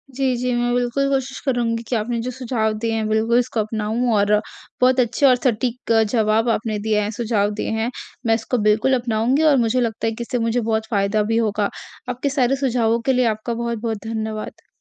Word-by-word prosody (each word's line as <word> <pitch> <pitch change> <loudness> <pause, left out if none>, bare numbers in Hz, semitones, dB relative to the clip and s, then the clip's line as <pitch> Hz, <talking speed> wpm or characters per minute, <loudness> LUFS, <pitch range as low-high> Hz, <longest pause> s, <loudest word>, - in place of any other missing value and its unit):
जी, 270 +1 0 0.2
जी। 250 0 0
मैं 240 0 0
बिल्कुल 245 +3 0
कोशिश 265 -1 -2
करूँगी 235 -3 0
कि 250 - -1
आपने 230 +2 -1
जो - - -2
सुझाव 235 -4 -1
दिए 230 - +1
हैं 220 -1 -1
बिल्कुल 220 +2 +2
इसको 245 -2 -2
अपनाऊँ 220 +3 -1
और 205 0 +2 0.5
बहुत 255 +1 +4
अच्छे 245 +3 +2
और 255 -2 +7
सटीक 245 -1 -1 0.2
जवाब 220 0 +2
आपने 220 -1 -1
दिए 215 -1 +2
हैं 205 - -2
सुझाव 215 -2 0
दिए - - -3
हैं। 225 +2 0 0.4
मैं 225 -1 +4
इसको 225 +3 -2
बिल्कुल 230 +5 +2
अपनाऊँगी 240 +5 +1
और 300 -3 +5
मुझे 250 +3 +1
लगता 225 -1 -1
है - - +1
कि 225 - -8
इससे 245 +1 -2
मुझे 235 +2 +1
बहुत 220 -1 -1
फ़ायदा 205 0 +1
भी 225 - +2
होगा। 210 -2 0 0.4
आपके 250 +3 -2
सारे 270 -1 +2
सुझावों 235 -4 +1
के 265 - +3
लिए 255 -1 +2
आपका 215 +3 -5
बहुत-बहुत 230 -1 -3
धन्यवाद। 220 -1 -5
230 Hz, 205 wpm, -21 LUFS, 220-250 Hz, 0.5 s, और